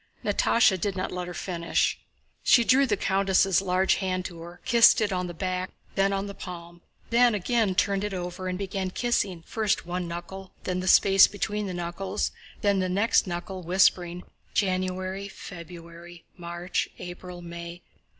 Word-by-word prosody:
Natásha 195 -6 +3
did 200 -2 -1
not 185 - -3
let 180 -1 -4
her 180 - -6
finish. 170 -3 -1 0.4
She 235 - +5
drew 265 +3 +4
the 205 -4 +1
countess' 195 -1 +2
large 190 0 +2
hand 185 -1 -2
to 170 -3 -7
her, 170 +1 -10
kissed 235 -1 +6
it 210 -3 0
on 180 -1 -1
the 175 - -6
back 185 +1 -2
and - - -33
then 195 0 +2
on 195 0 -1
the 200 - -6
palm, 175 -2 -9 0.3
then 240 -1 +5
again 210 -1 +1
turned 200 0 +1
it 210 - -2
over 180 0 -5
and 180 0 -2
began 190 -1 -3
kissing 190 -5 -1
first 215 +1 -1
one 175 0 -3
knuckle, 180 +3 -7
then 185 0 -2
the 185 - -4
space 195 +1 +7
between 205 0 -3
the 185 - -4
knuckles, 180 +4 -3 0.3
then 200 -1 +2
the 185 0 0
next 200 +3 +2
knuckle, 185 +2 -5
whispering, 180 0 +2 0.3
"January, 185 0 -1
February, 170 -2 -11
March, 175 +1 -3
April, 175 0 -8
May. 170 0 -8
185 Hz, 170 wpm, -26 LUFS, 175-195 Hz, 0.4 s, space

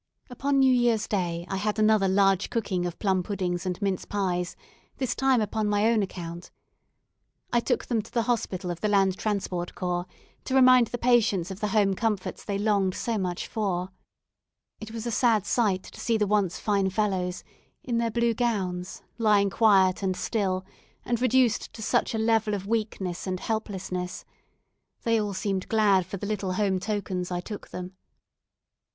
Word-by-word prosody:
Upon 275 +3 0
New 265 -1 +5
Year's 240 -3 +2
day 175 -4 -2
I 195 - -2
had 210 +2 -1
another 215 -2 +4
large 195 0 +3
cooking 195 -6 -1
of 175 - -6
plum 190 -3 +1
puddings 180 -2 -3
and 180 -1 -2
mince 195 -2 0
pies; 180 -3 -2 0.4
this 255 -3 -1
time 265 -3 +2
upon 215 0 -1
my 205 +1 +2
own 225 -2 +2
account. 175 -3 -6 1.0
I 240 - +5
took - - -1
them 230 -3 0
to 215 - -15
the 235 - +1
hospital 200 -6 -1
of 170 - -7
the 215 - +1
Land 195 -2 +3
Transport 190 -4 -2
Corps, 180 -1 -2 0.4
to 265 - -1
remind 255 -2 +7
the 245 - -4
patients 230 -7 +2
of 190 - -7
the 210 - -1
home 205 -1 +2
comforts 210 -1 -2
they 200 -1 -2
longed 200 -3 +1
so 230 -3 -1
much 180 -2 -2
for. 190 -4 -2 0.9
It 220 - -8
was 225 0 -6
a 235 - -2
sad 220 -3 +2
sight 200 -6 +1
to - - -12
see 230 -1 +1
the 210 - +2
once 200 -3 +1
fine 200 -2 +1
fellows, 185 -3 -1 0.4
in 235 -2 -1
their 230 0 +1
blue 235 +1 +1
gowns, 195 -6 -2 0.2
lying 205 -3 +3
quiet 195 -4 +4
and 185 -2 -1
still, 190 -4 -1 0.4
and 240 -1 -1
reduced 255 -2 +2
to 220 - -7
such 225 - +1
a - - 0
level 220 -1 +2
of 195 -1 -5
weakness 200 -5 -2
and 185 -1 -2
helplessness. 190 -5 -4 0.8
They 230 -1 +2
all 205 -2 -3
seemed 190 -1 -2
glad 200 -5 +3
for 195 - -5
the 205 - -5
little 200 -3 -2
home 190 -1 +1
tokens 185 -3 -3
I 175 -1 -2
took 205 +3 -7
them. 180 +1 -7
205 Hz, 180 wpm, -27 LUFS, 185-225 Hz, 1.0 s, remind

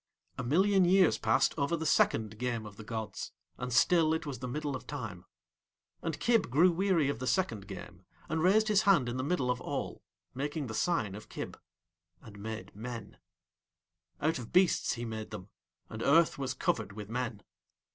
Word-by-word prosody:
A - - -2
million 190 +9 +4
years 185 0 +4
passed 110 0 +3
over 140 +4 +1
the 160 - -4
second 110 -7 +2
game 120 -3 -2
of 105 -1 -10
the 110 - -10
gods, 110 0 -5 0.3
and 125 +1 -4
still 160 +4 +4
it 160 - -4
was 135 -5 -5
the 125 - -4
Middle 145 +2 -3
of 130 - -8
Time. 110 -11 -6 0.8
And 160 -3 -3
Kib 230 - +2
grew 165 +8 +5
weary 175 -4 +2
of 140 -5 -2
the 130 - -3
second 115 - 0
game, 90 -3 -9 0.3
and 160 0 -1
raised 210 +5 +4
his 210 -2 +4
hand 195 - +4
in 120 +1 -3
the 130 - -1
Middle 140 -5 +1
of 125 0 -3
All, - - -4 0.3
making 145 +2 -3
the 110 - -6
sign 110 - 0
of 105 +1 -10
Kib, - - -6 0.6
and 105 -3 -13
made 105 -2 -6
Men: 115 -1 -7 1.0
out 155 -2 +1
of 115 - -8
beasts 185 -1 +3
he 120 0 -5
made 110 -1 -5
them, 100 -2 -8 0.4
and 110 - -7
Earth 160 +4 +4
was 130 -1 -2
covered 110 -5 -1
with 105 -1 -7
Men. 115 -2 -3
125 Hz, 185 wpm, -31 LUFS, 110-165 Hz, 1.0 s, grew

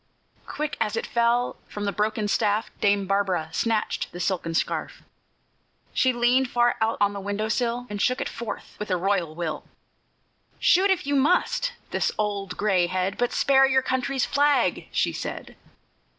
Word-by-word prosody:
Quick, 300 0 -4
as 220 -1 0
it 225 - -2
fell, 235 +1 +1
from 205 0 -5
the 200 - 0
broken 210 +2 -1
staff 210 +1 +1
Dame 200 -1 +2
Barbara 190 -5 0
snatched 220 +5 -1
the 175 - -8
silken 170 -2 -1
scarf. - - -2 0.9
She 260 - +3
leaned 245 +2 +2
far 240 0 +2
out 220 +1 +1
on 205 0 +2
the 200 - -5
window 205 +2 -2
sill, 240 +1 -1
And 205 -2 -4
shook 255 +1 +2
it - - -2
forth 225 -3 -7
with 210 - -5
a 185 - +1
royal 180 -4 0
will. 170 -2 -3 1.0
"Shoot, 380 +3 +4
if 365 -4 +1
you 285 0 0
must, 485 - +2 0.2
this - - 0
old 200 -3 -2
gray 190 -4 +2
head, 185 +2 -1
But 245 0 0
spare 270 -1 +4
your 265 -1 +2
country's 260 0 0
flag," 280 -9 +2
she - - +1
said. - - -6
215 Hz, 165 wpm, -25 LUFS, 200-255 Hz, 1.0 s, Shoot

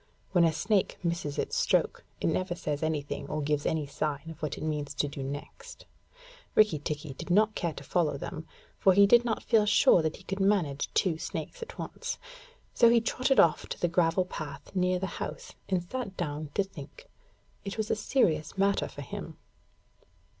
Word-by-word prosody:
When 175 -2 +4
a 165 - +4
snake 195 +6 0
misses 170 -4 -2
its - - -2
stroke, - - +1 0.2
it - - -3
never 175 +2 0
says 150 -4 -3
anything 145 -2 -2
or 155 - -2
gives 145 0 0
any 155 -2 0
sign 150 +2 -3
of 165 - -13
what 150 - -3
it - - -6
means 150 -2 -3
to 145 - +1
do 140 -1 -6
next. 140 +2 -7 0.7
Rikki 210 -8 +5
tikki 150 -1 -4
did 130 - -9
not 210 +4 +4
care 170 -5 -2
to 140 - -9
follow 155 -2 0
them, 160 +3 -6 0.3
for 190 - +5
he 200 +2 +7
did 240 +4 +6
not 230 -2 -2
feel 220 -3 +3
sure 185 - +6
that 160 0 -1
he - - -14
could 195 +1 -4
manage 190 -8 +1
two 165 -4 +2
snakes - - -5
at 465 +1 -8
once. 485 +1 -5 0.6
So 235 - +6
he 235 0 +6
trotted 255 +4 +1
off 165 - +4
to - - -5
the 175 - +2
gravel 170 +1 +2
path 150 -6 -7
near 180 0 +2
the 185 - -2 0.2
house, - - -5 0.2
and 185 -2 +1
sat 200 +1 -5
down 150 -3 -3
to 200 - +3
think. 485 - -12 0.6
It 195 +1 -5
was 220 -1 -1
a - - +3
serious 170 - +1
matter 200 0 +2
for 145 - -8
him. - - -7
170 Hz, 195 wpm, -29 LUFS, 150-200 Hz, 0.7 s, he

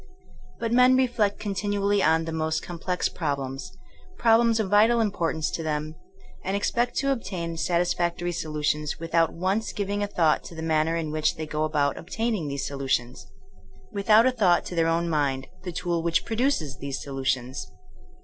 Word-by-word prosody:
But 230 -1 -2
men 250 +1 +6
reflect 235 -6 +1
continually 205 0 0
on 160 -1 +3
the 165 - -4
most 160 0 -1
complex 180 +1 -2
problems 135 -1 -4 0.3
— 370 0 -25
^problems 230 0 +4
of 215 - 0
vital 220 +3 +5
impor 205 -7 0
tance 160 -1 -2
to - - -3
them 155 -1 -2 0.3
— 385 - -23
^and 190 +2 -1
expect 240 +4 0
to 275 0 +1
obtain 175 -10 -3
satisfac 175 +1 0
tory 175 0 -2
solutions, 150 -2 -2
without 165 -1 +1
once 190 +6 -1
giving 205 0 -2
a 205 - 0
thought 165 -6 +2
to 170 - -9
the 160 - -6
manner 160 0 +1
in 160 -2 -2
which 155 0 +1
they 160 - -4
go 155 0 -1
about 145 -2 0
obtaining 215 -2 -2
those 140 -1 -3
solutions; 130 -3 -2 0.6
without 215 +2 +4
a 260 - +4
thought 195 -8 +3
to - - -6
their 165 -1 +2
own 165 +1 +1
mind, 140 -4 0 0.2
the 180 -1 -5
tool 175 -1 -1
which 170 0 +1
produces 225 - -1
those 140 -1 -4
solutions. 130 -1 -3
170 Hz, 180 wpm, -26 LUFS, 155-205 Hz, 0.6 s, men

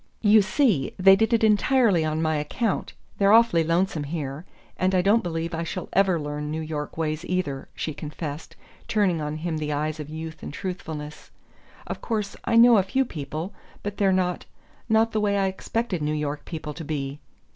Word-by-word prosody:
"You 215 0 +7
see, 200 - +1
they 195 +1 +7
did 225 +4 +1
it 230 -1 +3
entirely 215 -3 +4
on 155 +1 -1
my 155 -1 +1
account; 190 +8 -2 0.3
they're 200 0 +5
awfully 225 -7 +5
lonesome 165 -2 0
here; 145 0 -5 0.3
and 185 +1 +1
I 180 - +3
don't 210 +4 +4
believe 165 -1 -3
I 165 - -2
shall 175 +2 -5
ever 190 -3 +3
learn 150 0 -4
New 155 +1 -3
York 155 -1 -5
ways 155 0 -2
either," 180 -7 -2
she 155 - -3
confessed, 150 +1 -7 0.3
turning 190 -7 +1
on 150 0 -3
him 160 +1 -3
the 150 -1 -2
eyes 155 +2 -2
of 150 -1 -6
youth 160 0 -7
and - - -6
truthfulness. 150 -3 -6 0.6
"Of - - -6
course 210 -3 -2
I 230 - +1
know 235 0 +8
a - - +5
few 260 +8 0
people; 155 - -5 0.3
but 205 0 -4
they're 195 -2 +3
not 180 -1 0 0.4
not 220 +1 +3
the 215 - 0
way 200 -1 +1
I 195 - +2
expected 190 0 -2
New 150 +1 0
York 150 -1 -3
people 155 -3 -6
to 165 - -7
be." 145 -2 -4
170 Hz, 190 wpm, -25 LUFS, 150-200 Hz, 0.6 s, know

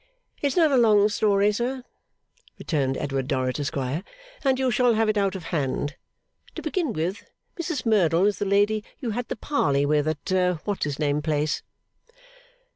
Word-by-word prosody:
'It's 280 -2 0
not 320 -4 +5
a 270 - +4
long 210 -4 +5
story, 205 -1 +2
sir,' 245 +4 -2 0.7
returned 135 -5 -1
Edward 135 -2 -2
Dorrit, 130 -1 -1
Esquire, 140 +2 -2 0.4
'and 265 -2 +3
you 260 -1 +1
shall 240 0 +3
have 225 0 +2
it 215 - +1
out 200 -2 +1
of 185 - -6
hand. 145 -1 -1 0.6
To - - -6
begin 345 - -1
with, 180 +1 -3 0.4
Mrs 320 -6 -3
Merdle 185 -5 +3
is 205 0 +1
the 205 - -1
lady 205 +2 +2 0.2
you 240 -4 -3
had 245 +2 -3
the - - -3
parley 145 - +1
with 150 +1 +2
at 180 +3 0
what's 205 -6 -1
his 145 -1 -3
name 150 -1 0
place. 150 0 0
195 Hz, 170 wpm, -25 LUFS, 150-225 Hz, 0.7 s, not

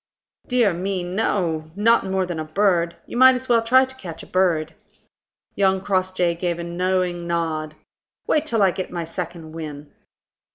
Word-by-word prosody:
"Dear 240 -7 +3
me, 185 +1 -2
no; 175 -4 -1
not 230 +1 +3
more 190 0 0
than 175 -3 -4
a - - -2
bird. 170 0 +1
You - - -6
might 260 +1 +7
as 255 +1 -5
well 235 -2 +4
try 255 +3 +5
to 260 0 -12
catch 170 -10 -8
a - - -10
bird." 165 -4 +1 0.8
Young 190 -1 +2
Crossjay 185 -2 0
gave 170 0 -2
a 170 - -5
knowing 175 0 -1
nod. 160 -2 -2 0.5
"Wait 310 0 +1
till 225 -7 +2
I 190 - +4
get 185 +1 -5
my 170 -1 -4
second 165 -1 -6
wind." 150 -2 -8
180 Hz, 170 wpm, -22 LUFS, 170-200 Hz, 0.8 s, might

